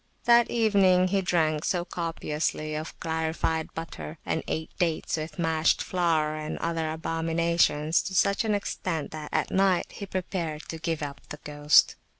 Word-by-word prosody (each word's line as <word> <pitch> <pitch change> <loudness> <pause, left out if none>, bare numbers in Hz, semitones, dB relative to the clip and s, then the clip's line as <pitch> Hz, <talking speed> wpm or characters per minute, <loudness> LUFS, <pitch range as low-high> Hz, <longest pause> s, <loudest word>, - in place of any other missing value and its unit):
That 235 -1 +5
evening 195 -5 +4
he 195 +1 +2
drank 160 -4 +1
so 175 -2 0
copiously 155 -3 -3
of 155 +1 -6
clarified 160 0 -1
butter, 165 -1 -6
and 160 - -1
ate 160 0 -3
dates 165 -2 0 0.2
mashed 160 -2 +2
with - - -5
flour 160 -4 +1
and 155 0 -4
other 165 -1 -1
abominations 165 -1 +1
to 190 - -4
such 200 +4 +3
an 215 -2 +1
extent, 175 -5 -3
that 155 -1 -7
at - - 0
night 190 -2 +2
he 200 - -7
prepared 175 -5 -3
to 165 - -5
give 165 -2 -2
up 140 -1 -6
the 150 - -6
ghost. 150 0 +4
165 Hz, 155 wpm, -27 LUFS, 155-180 Hz, 0.2 s, That